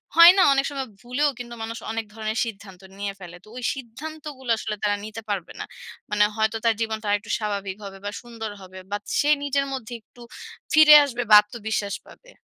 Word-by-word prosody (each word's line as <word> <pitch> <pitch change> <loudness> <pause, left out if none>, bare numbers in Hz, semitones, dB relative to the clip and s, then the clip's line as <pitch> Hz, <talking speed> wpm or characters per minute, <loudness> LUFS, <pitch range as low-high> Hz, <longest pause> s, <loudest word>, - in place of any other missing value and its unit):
হয় 335 +1 +11
না? - - +6
অনেক 275 0 +1
সময় 270 -2 -4
ভুলেও 255 +5 0
কিন্তু 240 -1 -7
মানুষ 225 +1 -5
অনেক 225 0 -3
ধরনের 220 0 -4
সিদ্ধান্ত 195 -4 -9 0.2
নিয়ে 200 0 -3
ফেলে। 180 -1 -10
তো - - -20
ওই 250 - -7
সিদ্ধান্তগুলো 275 +1 -9
আসলে 215 -1 -4
তারা 205 -1 +2
নিতে 220 +1 -7
পারবে 195 -5 -3
না। - - -3 0.5
মানে 210 0 +4
হয়তো 220 0 0
তার 230 - +4
জীবনটা 220 -1 -3
আর 205 - +4
একটু 220 - -8
স্বাভাবিক 200 -3 -3
হবে 195 -1 -8
বা, - - -1
সুন্দর 230 -3 -7
হবে 185 0 -11
বা, 205 - 0 0.2
সে 290 - +2
নিজের 280 0 0
মধ্যে 245 -3 -6
একটু 240 +2 -20 0.5
ফিরে 310 -1 +9
আসবে 245 -3 -4
বা, 210 - +9
আত্মবিশ্বাস 210 -2 -4
পাবে। - - -17
225 Hz, 200 wpm, -24 LUFS, 205-265 Hz, 0.5 s, হয়